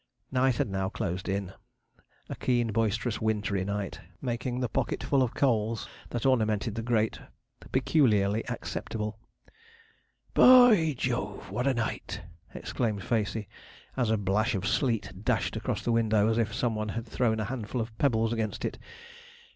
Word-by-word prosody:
Night 130 -1 +3
had - - 0
now 95 -1 -1
closed 95 +2 -3
in 95 -1 -2 0.7
a - - -5
keen, 120 -3 +1
boisterous, 115 +2 0
wintry 105 -3 0
night, 100 0 -3 0.2
making 125 0 -2
the 125 - 0
pocketful 135 +3 0
of 125 -3 0
coals 115 -4 +1 0.2
that 120 0 -3
ornamented 110 -4 +2
the 115 - -3
grate 110 -2 0 0.5
peculiarly 115 -7 +3
acceptable. 110 -2 -4 1.1
'B - - +3
o 250 -1 +10
y 160 - +3
Jove, 125 0 -3
what 125 +2 -1
a 135 - +2
night!' 115 -6 -3 0.3
exclaimed 105 -5 -2
Facey, 110 -2 -1 0.5
as 125 -4 +1
a 110 - +3
blash 105 +3 +1
of 95 +1 -2
sleet 115 - 0
dashed - - 0
across - - -2
the 120 - 0
window 110 -2 +3
as 115 +1 +1
if 110 -2 +1
some 120 +2 0
one 110 0 -3
had 115 +2 -4
thrown 110 -1 0
a 110 - -1
handful 120 +1 -4
of 110 -1 -4
pebbles 115 -4 +2
against 110 -2 -2
it. - - -4
115 Hz, 155 wpm, -29 LUFS, 105-125 Hz, 1.1 s, o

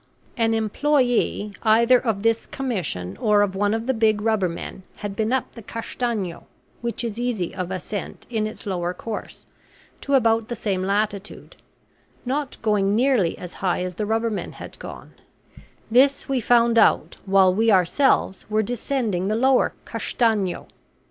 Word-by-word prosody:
An 225 -1 +2
employee, 240 -2 +1
either 235 +3 +5
of 220 -5 -2
this 230 0 +1
commission 180 - -3
or 210 -1 +3
of 195 -2 -1
one 205 +1 +1
of 225 +1 -1
the 265 - +1
big 220 -2 +2
rubbermen, 200 -4 -1
had 205 -1 -6
been 220 +2 0
up 260 0 0
the 230 - -11
Castanho, 225 -4 -4 0.3
which 235 0 -3
is 230 -1 -4
easy 235 -8 -2
of 180 -2 -4
ascent 190 +2 -5
in 220 -3 -1
its 215 - -9
lower 180 -2 -2
course, 225 -2 -7 0.6
to 280 - +1
about 225 -3 +3
the 240 - -4
same 200 -4 -2
latitude, 200 +1 -2 0.7
not 275 +2 -2
going 205 -2 +2
nearly 235 -8 +2
as 180 -1 -8
high 180 -1 0
as 180 0 -4
the 210 +3 -3
rubbermen 225 -1 -1
had - - -10
gone; - - -9 0.8
this 270 +4 +4
we 265 -2 0
found 235 0 +4
out 220 - +3
while 190 -1 +5
we 225 +4 +2
ourselves 190 +2 +2
were 215 0 +2
descending 225 -5 -1
the 215 - +1
lower 260 +2 +3
Castanho. 215 -6 0
220 Hz, 155 wpm, -23 LUFS, 195-235 Hz, 0.8 s, either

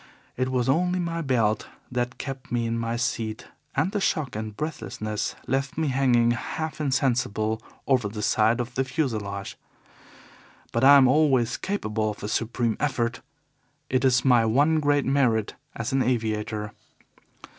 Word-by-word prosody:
It 130 +1 -1
was 125 -2 0
only 180 +6 +2
my 170 -1 -2
belt 115 -7 +1 0.2
that 125 0 -2
kept 135 -2 -7
me 120 -1 0
in 115 0 -1
my 115 0 -2
seat, 115 -2 -3 0.3
and 155 +8 +1
the 205 -1 -1
shock 155 - 0
and 110 -1 -5
breathlessness 110 -8 -4
left 135 +2 -1
me 160 -2 +1
hanging 125 -3 +3
half 155 +6 -4
insensible 120 -6 0 0.2
over 125 -6 +2
the 105 0 -5
side 110 +3 +3
of 120 0 -3
the 135 - +1
fuselage. 110 -9 -3 1.1
But 115 - 0
I 140 +1 +9
am 135 -2 +6
always 130 -4 +3
capable 110 - -2
of 105 - -7
a - - -2
supreme 115 +1 -1
effort 125 -4 -1 0.7
it 130 0 +2
is 130 -1 +3
my 125 -3 +5
one 145 +8 +3
great 145 -2 +2
merit 125 -6 +2 0.2
as 115 +2 -3
an 135 - +3
aviator. 110 -3 -1
125 Hz, 155 wpm, -25 LUFS, 110-135 Hz, 1.1 s, I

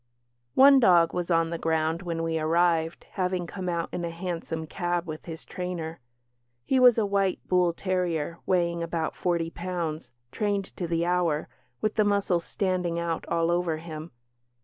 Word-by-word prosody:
One 275 +1 +8
dog 175 -8 +5
was 180 -1 -2
on 165 -1 +2
the 170 - -3
ground 160 +1 0
when 165 -2 -3
we 165 -1 0
arrived, 165 +1 +1
having 185 -2 -1
come 185 +1 -5
out 170 -1 -1
in 175 - -3
a 170 - -2
hansom 165 -2 -4
cab 175 +2 -2
with 155 -2 -7
his 165 -1 -8
trainer. 170 -3 -5 0.7
He 265 - +2
was 250 -2 +7
a 220 - +2
white 195 -2 +1
bull 180 -1 +3
terrier, 170 -3 -2
weighing 170 -2 +1
about 165 -1 -2
forty 170 -2 -1
pounds, 170 -3 -4 0.2
"trained 205 +3 -1
to 175 - -2
the 165 0 0
hour", 175 -4 +1 0.3
with 215 0 -1
the 215 - +5
muscles 200 -4 +1
standing 180 -3 -1
out 170 -1 -2
all 170 0 +1
over 175 -2 0
him. 160 0 -7
170 Hz, 170 wpm, -27 LUFS, 165-180 Hz, 0.7 s, One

